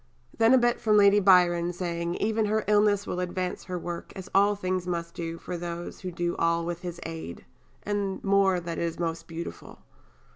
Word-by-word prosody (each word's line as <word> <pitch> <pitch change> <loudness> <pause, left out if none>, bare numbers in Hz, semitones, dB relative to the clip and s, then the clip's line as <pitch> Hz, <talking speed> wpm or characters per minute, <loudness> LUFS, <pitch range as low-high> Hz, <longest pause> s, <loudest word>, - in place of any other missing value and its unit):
Then 230 +3 +5
a - - +6
bit 240 -1 +2
from 215 -3 +4
Lady 200 0 +6
Byron, 175 -3 +4
saying, 170 -1 -3
"even 220 +1 0
her 215 +1 0
illness 205 -1 +3
will 180 - -3
advance 180 0 -3
her 180 0 -4
work 175 0 -6
as 190 0 -8
all 200 +1 +4
things 185 -2 -2
must 170 -1 -4 0.2
for 180 - -5
those 170 0 -6
who 185 -2 -5
do 175 0 -2
all 170 0 +1
with 175 0 -4
His 175 -1 -6
aid," 160 - -7 0.4
and 200 -2 -2
more 195 -2 +3
that 170 -1 -5
is 165 -1 -2
most 165 -1 -3
beautiful. 165 0 -8
180 Hz, 185 wpm, -27 LUFS, 170-200 Hz, 0.4 s, a